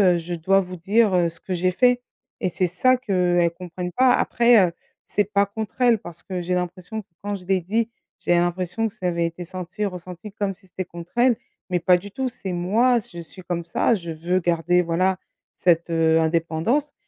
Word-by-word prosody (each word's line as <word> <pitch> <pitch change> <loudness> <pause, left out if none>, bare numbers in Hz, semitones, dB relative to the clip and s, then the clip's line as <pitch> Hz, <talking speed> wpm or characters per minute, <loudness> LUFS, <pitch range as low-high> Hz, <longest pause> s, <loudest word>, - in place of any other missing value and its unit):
heu, - - +1
je 170 +1 -6
dois 195 +4 +3
vous 185 -1 -7
dire, 205 +4 +3
heu, 175 -1 +3
ce 165 0 -9
que 185 - -5
j'ai 185 +1 +1
fait 245 +5 +3 0.4
et 185 - 0
c'est 185 +1 0
ça 225 +9 +3
qu'elles 180 -7 +2
comprennent 180 +1 -6
pas 255 0 +5
après, 235 -5 +4
heu, - - -11 0.3
c'est 205 - +1
pas 200 0 +3
contre 220 +4 -6
elles 240 -2 +5
parce 175 -3 -10
que 185 -2 -4
j'ai 180 +1 -1
l'impression 180 +4 -3
que 200 - -27 0.2
quand 205 0 -2
je 185 -2 -10
l'ai 190 -1 +2
dit, 220 +6 0 0.3
j'avais 175 - +2
l'impression 180 +5 0
que 205 - -9
ça 180 - -3
avait 170 -1 0
été 165 +1 -5
senti 185 +3 -7
et - - +3
ressenti 180 +2 -8
comme 200 -2 -2
si 190 - -21
c'était 185 +1 -5
contre 170 0 -11
elles 245 0 +5 0.4
mais 180 - +2
pas 180 +1 +4
du 200 +3 -10
tout. 265 +3 -2
C'est 200 -6 -6
moi 220 +8 +3
s 225 - -4
je 175 - -8
suis 170 +3 -10
comme 170 -1 -3
ça. 175 - +2
Je 170 -5 -6
veux 170 +3 0
garder 175 0 +2
voilà 185 +3 +1 0.4
cette, 170 -1 +2
heu, 165 -1 +3
indépendance 170 - 0
180 Hz, 220 wpm, -23 LUFS, 170-205 Hz, 0.4 s, pas